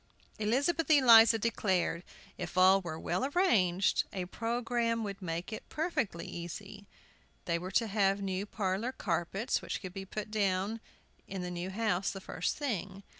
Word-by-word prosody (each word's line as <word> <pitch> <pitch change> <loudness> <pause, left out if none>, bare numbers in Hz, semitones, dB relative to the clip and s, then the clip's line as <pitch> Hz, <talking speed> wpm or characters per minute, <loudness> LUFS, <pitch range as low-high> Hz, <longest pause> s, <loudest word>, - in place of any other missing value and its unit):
Elizabeth 280 +11 +1
Eliza 230 -6 +8
declared 190 -6 0 0.3
if 175 0 -6
all 190 +1 +6
were 160 -3 -6
well 175 +8 -1
arranged 215 - +2
a 185 -2 -3
programme 230 +2 -1
would 200 -1 -5
make 170 +4 -4
it - - -8
perfectly 300 - -2
easy. 195 +4 -8 0.6
They 170 -1 0
were 180 +2 -5
to 230 - +3
have 200 -2 +1
new 195 0 -3
parlor 205 +4 -2
carpets, 190 +6 -1
which - - -4
could 185 -2 -8
be 195 0 -6
put 210 +2 -6
down 200 +1 0 0.5
in 190 -2 -5
the 180 - -4
new 175 +1 -4
house 200 -2 0
the 195 - -5
first 180 -2 -3
thing. 200 - -3
200 Hz, 155 wpm, -32 LUFS, 185-230 Hz, 0.6 s, Eliza